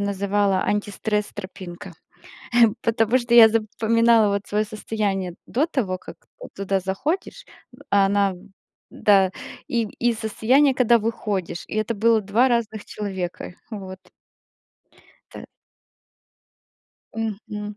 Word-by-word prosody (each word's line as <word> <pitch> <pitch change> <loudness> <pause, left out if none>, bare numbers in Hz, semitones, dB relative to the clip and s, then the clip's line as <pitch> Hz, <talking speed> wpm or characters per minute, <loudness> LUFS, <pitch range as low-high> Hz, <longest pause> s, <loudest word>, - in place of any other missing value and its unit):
называла 200 -1 0
антистресс- 210 0 -1
тропинка. 185 -2 -9 0.9
Потому 230 +1 +2
что 240 -1 -2
я 230 -2 +9
запоминала, 225 0 +2
вот, 200 0 -3
свое 210 +1 0
состояние 205 -4 -3
до 275 +6 0
того, 220 - -2
как - - -12 0.4
туда 195 0 -1
заходишь, 300 - -3 0.4
а 195 -1 +3
на 200 -1 +2 0.6
Да, 195 -3 +4 0.4
и, 235 -2 0 0.2
и - - +1
состояние, 240 +5 +2
когда 240 -2 +4
выходишь, 205 -6 -3
и - - -7
это 215 +2 -1
было 225 +1 +3
2 215 +6 +2
разных 225 -3 -1
человека, 190 -3 -5 0.2
вот. 190 -3 -7 1.3
Та - - -9 1.7
Мгм. 210 -1 -5
210 Hz, 110 wpm, -23 LUFS, 195-230 Hz, 1.7 s, я